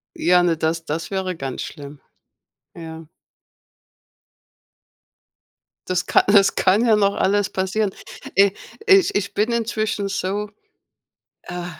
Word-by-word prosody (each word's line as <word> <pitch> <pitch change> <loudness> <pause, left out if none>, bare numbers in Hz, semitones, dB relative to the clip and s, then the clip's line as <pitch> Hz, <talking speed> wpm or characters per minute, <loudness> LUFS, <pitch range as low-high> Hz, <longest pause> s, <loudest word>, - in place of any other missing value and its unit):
Ja, 180 0 +3
ne 170 -2 +1
das 165 +1 -2
das 165 +4 -4
wäre 190 -2 -2
ganz 135 -4 -5
schlimm. 145 -1 -9 0.7
Ja. 160 -1 -9 2.8
Das 185 -1 -1
ka - - +3
das 200 -1 +4
kann 200 +5 +3
ja 225 -2 +5
noch 200 -1 +2
alles 205 +1 +1
passieren. 190 +2 -1 0.4
E 200 0 +5 0.3
ich 390 -2 +4
ich 205 0 -1
bin 210 +4 0
inzwischen 220 -3 -1
so, 205 +1 -3 0.9
äh 175 0 -6
190 Hz, 115 wpm, -21 LUFS, 170-205 Hz, 2.8 s, ja